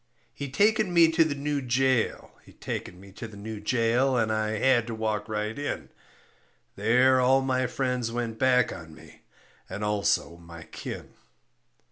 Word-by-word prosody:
He 140 -1 -6
taken 210 - +2
me 170 -2 +5
to 165 0 +4
the 155 -3 -2
new 145 0 -2
jail, 130 -1 0
he - - -18
taken 90 - -6
me 100 0 -14
to 110 +4 -8
the 110 -2 -13
new 110 +1 -7
jail, 125 +4 +1
And 110 -2 +1
I 110 0 -1
had 120 -1 +3
to 115 - -4
walk 110 -1 -2
right 105 0 -2
in. 145 0 -4 0.9
There 125 +5 +4
all 130 +2 +4
my 130 -1 0
friends 125 -3 -2
went 115 -1 -4
back 125 -2 +3
on 80 -2 -11
me - - -16 0.5
And 105 - -5
also 105 -4 0
my 85 -1 -12
kin. - - -8
120 Hz, 165 wpm, -27 LUFS, 105-135 Hz, 0.9 s, me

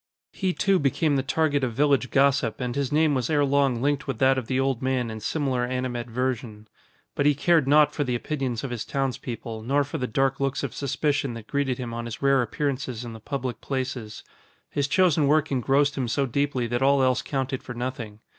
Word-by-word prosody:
He 190 -2 0
too 195 0 +2
became 145 +2 +1
the 135 - +2
target 145 0 +1
of 120 -3 -1
village 140 0 +2
gossip 135 -4 +2
and 125 -1 -3
his 140 -2 -1
name 155 0 +3
was 130 +1 -1
ere 145 -2 +3
long 135 -3 +1
linked 145 0 0
with 135 -4 -2
that 135 +2 +4
of 130 -4 -3
the 130 0 0
old 135 -2 0
man 130 -3 0
in 110 - -6
similar 130 -1 -1
animadversion. 120 -3 -3 0.5
But 145 - +1
he 145 - +4
cared 160 0 +3
naught 150 +1 +5
for 145 - 0
the 125 -3 -1
opinions 130 -3 -3
of 135 - -4
his 120 -2 -3
townspeople 125 -4 -4
nor 140 +5 +1
for 145 +3 -5
the 125 - -1
dark 135 +3 0
looks 135 0 -1
of 140 - -3
suspicion 140 -2 -1
that 115 -2 -8
greeted 135 -1 -1
him 120 -2 -5
on 120 0 -4
his 115 -1 -6
rare 135 -1 +3
appearances 130 -1 -3
in 115 - -7
the 110 - -9
public 125 -2 -4
places. 130 -5 -4 0.5
His 140 -1 0
chosen 160 -2 +3
work 155 +1 +2
engrossed 140 +2 +2
him 125 - -1
so 135 +4 0
deeply 135 -1 -1
that 120 +1 -2
all 135 0 +4
else 130 -1 +2
counted 135 -1 -3
for 125 - -8
nothing. 120 -4 -5
135 Hz, 210 wpm, -25 LUFS, 120-140 Hz, 0.5 s, naught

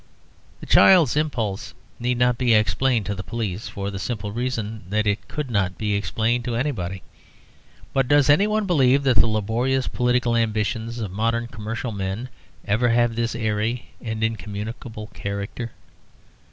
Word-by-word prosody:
The - - -7
child's 170 -10 +6
impulse 120 -10 -2 0.2
need 125 +1 0
not 125 -1 +2
be 120 -3 +4
explained 110 +3 +2
to 100 - -2
the 95 - -5
police, 110 -2 -4
for 100 0 -4
the 95 - -5
simple 105 0 -3
reason 115 -2 -3
that 105 +1 +1
it 100 -1 -1
could 150 -4 -4
not 95 -4 0
be 105 -1 -1
explained 110 +5 0
to 120 -2 -2
anybody. 95 -9 -2 0.9
But 135 -2 +2
does 145 0 +4
any 150 +9 +5
one 215 0 0
believe 140 -6 +3
that 130 -5 +3
the 105 - +6
laborious 115 +5 0
political 125 -1 +1
ambitions 115 +1 -1
of 105 -5 -4
modern 115 +4 0
commercial 115 +1 -5
men 100 +4 -4 0.4
ever 115 +4 +2
have 120 0 +2
this 115 0 -1
airy 110 +1 -1
and 110 -1 -3
incommunicable 110 0 -4
character? 100 +4 -4
115 Hz, 155 wpm, -23 LUFS, 105-125 Hz, 0.9 s, child's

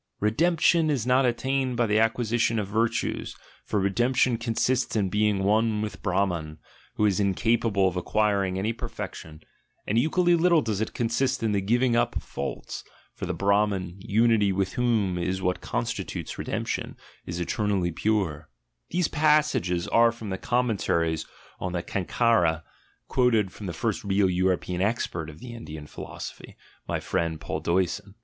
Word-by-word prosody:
"Redemption 160 - +3
is 135 -6 0
not 130 +1 +4
attained 130 +1 0
by 120 - +3
the 105 0 +2
acquisition 115 0 +1
of 105 -3 -1
virtues; 110 +3 -1 0.3
for 105 - -1
redemption 120 +6 +2
consists 120 +2 0
in 100 -3 +1
being 105 0 +1
one 110 +2 +2
with 100 -2 -6
Brahman, 90 -5 -1 0.4
who 105 - +2
is 100 -2 +2
incapable 100 0 +2
of 90 - -2
acquiring 100 0 +1
any 105 +4 -1
perfection; 80 -7 -7 0.4
and 110 +3 +2
equally 175 +5 +3
little 170 -2 +4
does 110 -2 -2
it 110 - -3
consist 120 +2 0
in 110 - +1
the 100 -1 +1
giving 120 +4 +2
up 120 - +1
of - - -3
faults, 70 - -5 0.3
for - - -6
the - - -1
Brahman, 100 -3 +1
unity 110 0 +3
with 95 0 -1
whom 110 -7 +1
is 95 +2 -1
what 90 -1 -1
constitutes - - -4
redemption, - - -3 0.3
is 85 0 -4
eter 105 +4 -1
nally 95 -4 +1
pure" 85 -6 -1 0.4
(these 175 -1 +1
passages 150 - +2
are 115 0 +5
from 115 -3 -7
the 95 - -2
Commentaries 100 -10 0 0.3
of 90 -1 -3
the 85 -1 -2
Cankara, 90 -5 +1 0.4
quoted 115 -6 +2
from 105 - -8
the - - -2
first 110 +5 -2
real 100 -1 +2
European 90 0 0
expert 95 -6 -1
of 75 - -11
the 120 +4 -9
Indian 80 -10 -8
philosophy, - - -9 0.3
my - - -1
friend 80 -2 -2
Paul - - -4
Deussen). 95 +3 -1
105 Hz, 155 wpm, -26 LUFS, 95-120 Hz, 0.4 s, are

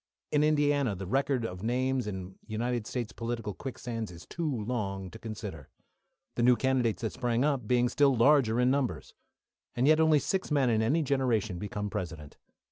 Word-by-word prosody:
In 150 0 +3
Indiana, 145 -6 +2
the 95 +1 -6
record 135 +3 0
of 90 -4 -6
names 125 +2 0
in 95 -2 -5
United 115 +1 -2
States 120 -3 -3
political 115 -3 -4
quicksands 115 -1 -5
is 85 -1 -11
too 165 -3 -3
long 95 -6 -3
too 110 - -10
consider, 105 - -7 0.6
the - - -2
new 125 +1 +6
candidates 125 -2 0
that 110 - -2
sprang 120 0 0
up 135 -7 0
being 125 0 +3
still 140 +1 +3
larger 120 -2 +4
in 125 +1 +4
numbers. 135 -3 -2 0.6
And 120 - +1
yet 155 +1 +5
only 160 -1 +5
six 185 +6 -1
men 140 -5 +2
in 110 -1 +2
any 145 +9 +2
generation 120 -9 0
become 105 0 -4
President. 85 -8 -6
120 Hz, 175 wpm, -29 LUFS, 105-135 Hz, 0.6 s, new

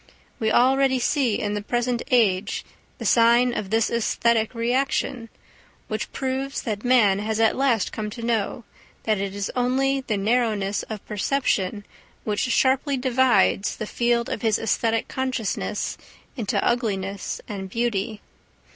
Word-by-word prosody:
We 220 -1 +1
already 265 +2 +4
see 250 -2 +1
in 205 0 -2
the 210 - -2
present 240 +2 -1
age 215 -5 +2 0.3
the - - -7
sign 240 +1 +4
of 195 - -3
this 225 +1 +1
æsthetic 235 0 +1
reaction, 240 0 -1 0.6
which - - -3
proves 265 +1 -3
that 215 -3 -3
man 230 -6 +4
has 215 +1 -2
at 225 -1 +3
last 255 -7 +1
come 215 -1 -4
to 230 +2 -8
know 230 0 -1 0.4
that 215 -2 +1
it 195 0 -3
is 200 -1 -3
only 265 +2 +1
the 220 -5 -2
narrowness 210 -2 +1
of 215 -2 -6
perception 210 -3 -1 0.4
which 210 -1 -2
sharply 265 +2 +2
divides 250 -6 +2
the 215 - -5
field 235 +1 0
of - - -4
his 220 -2 +2
æsthetic 225 +1 0
consciousness 260 -5 -3 0.4
into 225 -6 -2
ugliness 200 -5 -2
and 195 -3 -6
beauty. 220 -1 -2
230 Hz, 140 wpm, -24 LUFS, 210-250 Hz, 0.6 s, already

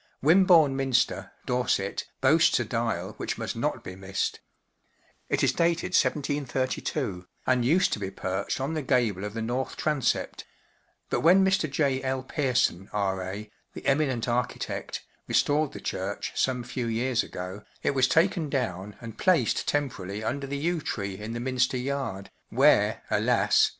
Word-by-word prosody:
Wimborne 165 -3 +6
Minster, 135 -2 +1
Dorset, 125 -6 0
boasts 150 +2 +5
a 120 - -1
dial 115 +1 -2
which - - -3
must - - -4
not - - -2
be 90 - -7
missed* 95 0 -2 0.9
It - - +1
is - - +4
dated 170 +2 0
1732, 130 - -1 0.2
and 130 -1 +2
used 170 +9 +3
to - - -2
be 95 -2 -3
perched 95 +2 -3
on 135 +4 -2
the 155 - -1
gable 120 -8 +1
of 105 +1 -5
the 115 - -2
north 125 +3 -2
transept; 145 -6 0 0.7
but - - +2
when 185 +4 +6
Mr, 190 -5 +2
J. 135 -1 +1
L, 130 -1 -2
Pearson, 125 - 0
R,A*, 100 +1 -2 0.2
the - - -8
eminent 135 -4 +1
architect, 120 +1 -2 0.2
restored 150 0 +2
the - - -8
church 95 +2 -3
some 125 -2 0
few 120 0 -3
years 115 +1 +1
ago, 90 +3 -7 0.2
it - - +2
was 130 -1 +3
taken 165 -1 +2
down 105 -7 -2
and 115 -2 -9
placed 170 - +2
tem¬ 145 -1 +2
pt - - -11
jrarily 100 +3 -6
under 140 +4 -2
the 140 +1 -3
yew 165 +3 -1
tree 100 -8 -3
in 110 +2 -5
the 120 - -3
Minster 130 +1 +1
yard, 125 -7 -3 0.2
where, - - +4
alas! - - +3
130 Hz, 160 wpm, -27 LUFS, 105-145 Hz, 0.9 s, Wimborne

